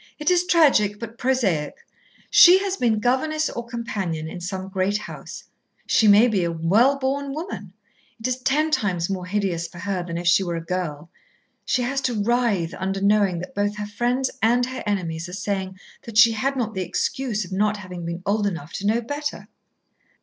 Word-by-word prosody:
It 300 Hz, +4 st, +1 dB
is 360 Hz, 0 st, +2 dB
tragic, 270 Hz, -, +4 dB
but 230 Hz, 0 st, -8 dB
prosaic. 210 Hz, -, 0 dB, 0.6 s
She 355 Hz, +1 st, +9 dB
has 390 Hz, -1 st, -1 dB
been 235 Hz, -, +1 dB
governess 305 Hz, +7 st, 0 dB
or 235 Hz, -, -5 dB
companion 200 Hz, -9 st, -4 dB
in 175 Hz, +2 st, -7 dB
some 190 Hz, +1 st, -4 dB
great 195 Hz, +1 st, 0 dB
house. 210 Hz, -, -9 dB, 0.4 s
She 220 Hz, -, +3 dB
may 210 Hz, +4 st, +7 dB
be 205 Hz, -6 st, +1 dB
a 170 Hz, -, 0 dB
well 205 Hz, +12 st, +3 dB
born 275 Hz, +1 st, -2 dB
woman. 305 Hz, -, -6 dB, 0.5 s
It 225 Hz, -, -2 dB
is 255 Hz, -1 st, -1 dB
ten 300 Hz, +4 st, +1 dB
times 185 Hz, -, 0 dB
more 185 Hz, -2 st, -4 dB
hideous 185 Hz, -4 st, -1 dB
for 170 Hz, -, -14 dB
her 190 Hz, 0 st, -2 dB
than 170 Hz, -1 st, -5 dB
if 175 Hz, -, -5 dB
she 175 Hz, +2 st, +5 dB
were 175 Hz, -2 st, -3 dB
a 165 Hz, 0 st, -5 dB
girl. 170 Hz, -3 st, -4 dB, 0.5 s
She 250 Hz, -, +1 dB
has 270 Hz, +3 st, -1 dB
to 245 Hz, -5 st, -1 dB
writhe 210 Hz, -6 st, +1 dB
under 190 Hz, +1 st, -2 dB
knowing 200 Hz, -2 st, +2 dB
that 180 Hz, -, -8 dB
both 205 Hz, +1 st, -1 dB
her 210 Hz, -, -3 dB
friends 245 Hz, +5 st, -1 dB
and 240 Hz, +2 st, +3 dB
her 255 Hz, +1 st, -6 dB
enemies 175 Hz, -4 st, -2 dB
are -, -, -9 dB
saying 190 Hz, -1 st, -3 dB, 0.3 s
that 230 Hz, -2 st, -5 dB
she 230 Hz, 0 st, +8 dB
had 265 Hz, +5 st, -1 dB
not 230 Hz, -4 st, -2 dB
the 190 Hz, -, -3 dB
excuse 215 Hz, +4 st, -2 dB
of 180 Hz, -, -13 dB
not 210 Hz, +2 st, +1 dB
having 180 Hz, -3 st, -8 dB
been 170 Hz, +1 st, -5 dB
old 205 Hz, 0 st, +1 dB
enough 170 Hz, -5 st, -5 dB
to 200 Hz, -, -3 dB
know 225 Hz, +3 st, +2 dB
better." 290 Hz, +5 st, -5 dB
210 Hz, 195 wpm, -23 LUFS, 185-245 Hz, 0.6 s, She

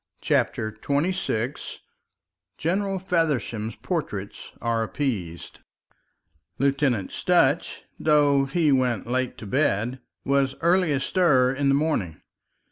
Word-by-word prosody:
CHAPTER 110 Hz, 0 st, 0 dB
XXVI 140 Hz, -, -2 dB, 0.8 s
GENERAL 195 Hz, +4 st, -1 dB
FEVERSHAM'S 150 Hz, -, -1 dB
PORTRAITS 105 Hz, -, -4 dB
ARE 115 Hz, -1 st, 0 dB
APPEASED 110 Hz, -, -4 dB, 1.0 s
Lieutenant 135 Hz, -7 st, +1 dB
Sutch, -, -, +1 dB, 0.2 s
though 145 Hz, -3 st, +3 dB
he 150 Hz, +2 st, +1 dB
went 125 Hz, -6 st, +1 dB
late 125 Hz, +1 st, -2 dB
to -, -, -9 dB
bed, 125 Hz, 0 st, 0 dB, 0.3 s
was 135 Hz, -1 st, +1 dB
early 175 Hz, -1 st, +3 dB
astir 140 Hz, -3 st, +2 dB
in 140 Hz, 0 st, 0 dB
the 135 Hz, -, +4 dB
morning. 140 Hz, -, -1 dB
135 Hz, 100 wpm, -25 LUFS, 115-155 Hz, 1.0 s, the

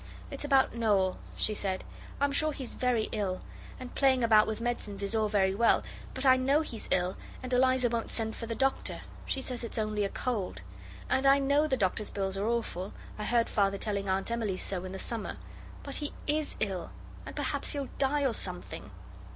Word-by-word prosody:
'It's -, -, -4 dB
about 275 Hz, -2 st, +4 dB
Noel,' 205 Hz, -5 st, +2 dB, 0.2 s
she 215 Hz, -, +2 dB
said. 190 Hz, -2 st, -2 dB, 0.4 s
'I'm 285 Hz, 0 st, +2 dB
sure 310 Hz, +2 st, +3 dB
he's 265 Hz, -3 st, -6 dB
very 245 Hz, -4 st, +1 dB
ill; 190 Hz, -3 st, -1 dB, 0.4 s
and 255 Hz, -1 st, -8 dB
playing 265 Hz, -3 st, +4 dB
about 215 Hz, -2 st, +6 dB
with 220 Hz, 0 st, -2 dB
medicines 230 Hz, -4 st, -3 dB
is 200 Hz, -, -1 dB
all 220 Hz, -1 st, +2 dB
very 190 Hz, -2 st, +3 dB
well, 230 Hz, +3 st, +4 dB, 0.3 s
but 260 Hz, -, -2 dB
I 260 Hz, -1 st, +7 dB
know 275 Hz, +4 st, +3 dB
he's 235 Hz, -8 st, -5 dB
ill, 180 Hz, +1 st, +1 dB, 0.3 s
and 255 Hz, 0 st, -3 dB
Eliza 255 Hz, 0 st, +4 dB
won't 230 Hz, -1 st, -2 dB
send 220 Hz, -1 st, -2 dB
for 230 Hz, -, -6 dB
the 230 Hz, -, -2 dB
doctor: 270 Hz, +2 st, +1 dB, 0.3 s
she 265 Hz, -, -1 dB
says 250 Hz, -2 st, -2 dB
it's 230 Hz, -, -5 dB
only 215 Hz, -1 st, 0 dB
a 200 Hz, -, 0 dB
cold. 200 Hz, -, -2 dB, 0.4 s
And 265 Hz, +1 st, +2 dB
I 275 Hz, +1 st, +7 dB
know 280 Hz, +2 st, +3 dB
the 265 Hz, -3 st, +1 dB
doctor's 205 Hz, +1 st, 0 dB
bills 195 Hz, -1 st, -2 dB
are 200 Hz, +2 st, -1 dB
awful. 220 Hz, -5 st, -2 dB, 0.3 s
I 210 Hz, -, -2 dB
heard 235 Hz, 0 st, +3 dB
Father 200 Hz, -1 st, +2 dB
telling 200 Hz, -2 st, -1 dB
Aunt 190 Hz, +4 st, 0 dB
Emily 220 Hz, -5 st, -1 dB
so 185 Hz, -1 st, -3 dB
in 185 Hz, -, -6 dB
the -, -, -4 dB
summer. 225 Hz, +3 st, -3 dB, 0.5 s
But 280 Hz, -, 0 dB
he 295 Hz, -1 st, -3 dB
is 300 Hz, 0 st, 0 dB
ill, 195 Hz, -5 st, -2 dB, 0.3 s
and -, -, -8 dB
perhaps -, -, -1 dB
he'll 280 Hz, -3 st, -3 dB
die 280 Hz, +1 st, +2 dB
or 255 Hz, -, +2 dB
something. -, -, -4 dB
230 Hz, 200 wpm, -30 LUFS, 200-265 Hz, 0.5 s, I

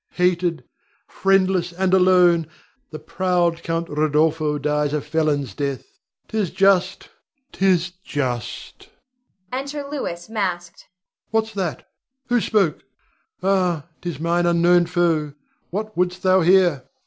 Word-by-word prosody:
Hated, 180 Hz, -2 st, 0 dB, 0.4 s
friendless, 190 Hz, -2 st, +1 dB
and 185 Hz, +1 st, -1 dB
alone, 180 Hz, -3 st, +4 dB, 0.4 s
the 155 Hz, -, -7 dB
proud 170 Hz, +1 st, 0 dB
Count 165 Hz, 0 st, -2 dB
Rodolpho 150 Hz, 0 st, +1 dB
dies 150 Hz, 0 st, 0 dB
a 150 Hz, -, +1 dB
felon's 150 Hz, -6 st, -1 dB
death. 140 Hz, +2 st, -3 dB, 0.4 s
'Tis 215 Hz, -5 st, -1 dB
just, 195 Hz, 0 st, +2 dB, 0.4 s
'tis 180 Hz, -2 st, +1 dB
just! 125 Hz, -, -5 dB, 0.6 s
[Enter 280 Hz, +2 st, -4 dB
Louis 260 Hz, -12 st, -5 dB
masked.] 185 Hz, -6 st, -4 dB, 0.4 s
What's 220 Hz, 0 st, -1 dB
that? 185 Hz, -5 st, -4 dB, 0.4 s
Who 245 Hz, -1 st, +2 dB
spoke? 195 Hz, -5 st, +1 dB, 0.6 s
Ah, 180 Hz, -5 st, +1 dB, 0.2 s
'tis 170 Hz, -5 st, -5 dB
mine 170 Hz, +2 st, +1 dB
unknown 175 Hz, 0 st, +4 dB
foe. 165 Hz, -5 st, 0 dB, 0.3 s
What 215 Hz, +3 st, -5 dB
wouldst 180 Hz, +1 st, -1 dB
thou 185 Hz, 0 st, +4 dB
here? 175 Hz, -6 st, +3 dB
175 Hz, 115 wpm, -21 LUFS, 155-190 Hz, 0.6 s, alone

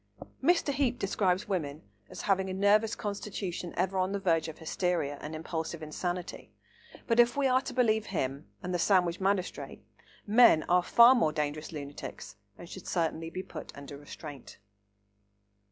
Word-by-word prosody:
Mr. 340 Hz, -5 st, +3 dB
Heape 260 Hz, -3 st, +1 dB
describes 190 Hz, -2 st, 0 dB
women 155 Hz, -7 st, -3 dB, 0.3 s
as -, -, -8 dB
having 190 Hz, -1 st, +1 dB
a 185 Hz, -, -3 dB
nervous 210 Hz, +3 st, +3 dB
constitution 195 Hz, -4 st, -4 dB
ever 190 Hz, 0 st, 0 dB
on 185 Hz, +1 st, 0 dB
the 200 Hz, -, -1 dB
verge 165 Hz, -4 st, +1 dB
of 160 Hz, -, -8 dB
hysteria 160 Hz, -3 st, -1 dB
and 155 Hz, +1 st, -6 dB
impulsive 160 Hz, 0 st, -4 dB
insanity; 175 Hz, +3 st, -5 dB, 0.5 s
but 230 Hz, 0 st, +1 dB
if 240 Hz, +3 st, +5 dB
we 280 Hz, -, +2 dB
are 260 Hz, 0 st, +4 dB
to -, -, -6 dB
believe 220 Hz, -4 st, +2 dB
him, 140 Hz, -5 st, -3 dB, 0.2 s
and 180 Hz, 0 st, -3 dB
the 175 Hz, -, 0 dB
Sandwich 180 Hz, -2 st, +2 dB
magistrate, 195 Hz, -1 st, -2 dB, 0.4 s
men 215 Hz, -7 st, +6 dB
are 180 Hz, +1 st, +3 dB
far 235 Hz, +7 st, +7 dB
more 230 Hz, -12 st, +2 dB
dangerous 150 Hz, 0 st, -3 dB
lunatics 145 Hz, -2 st, -8 dB, 0.2 s
and 175 Hz, -, -10 dB
should 185 Hz, +1 st, -10 dB
certainly 165 Hz, -1 st, -1 dB
be 185 Hz, +2 st, -5 dB
put -, -, -9 dB
under 140 Hz, 0 st, -9 dB
restraint. 145 Hz, -1 st, -10 dB
180 Hz, 160 wpm, -30 LUFS, 160-205 Hz, 0.5 s, far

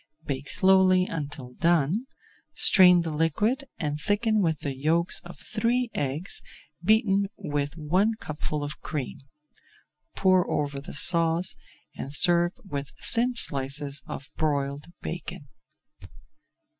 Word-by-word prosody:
Bake 135 Hz, 0 st, -4 dB
slowly 190 Hz, -1 st, +4 dB
until 145 Hz, -6 st, -6 dB
done, 170 Hz, -, +1 dB, 0.5 s
strain 180 Hz, -3 st, +6 dB
the 165 Hz, -, -4 dB
liquid 210 Hz, -, 0 dB
and 150 Hz, -3 st, -3 dB
thicken 215 Hz, +2 st, +1 dB
with 160 Hz, -5 st, 0 dB
the 140 Hz, -2 st, -3 dB
yolks 165 Hz, +6 st, +1 dB
of 175 Hz, -, -11 dB
three 235 Hz, +2 st, -1 dB
eggs 145 Hz, +7 st, -3 dB, 0.4 s
beaten 200 Hz, -1 st, +3 dB
with 145 Hz, -4 st, -3 dB
one 180 Hz, +8 st, +1 dB
cupful 150 Hz, -1 st, -4 dB
of 145 Hz, +1 st, -6 dB
cream. 140 Hz, -5 st, -5 dB, 1.0 s
Pour 185 Hz, -2 st, +3 dB
over 140 Hz, -2 st, -2 dB
the 145 Hz, -, -9 dB
sauce, 165 Hz, +2 st, +3 dB, 0.4 s
and 135 Hz, -, -6 dB
serve 175 Hz, +3 st, +5 dB
with 140 Hz, -6 st, -5 dB, 0.2 s
thin 245 Hz, +2 st, +1 dB
slices 140 Hz, -, +1 dB
of 135 Hz, +2 st, -8 dB
broiled 140 Hz, -2 st, -1 dB, 0.2 s
bacon. -, -, -6 dB
165 Hz, 120 wpm, -26 LUFS, 145-190 Hz, 1.0 s, strain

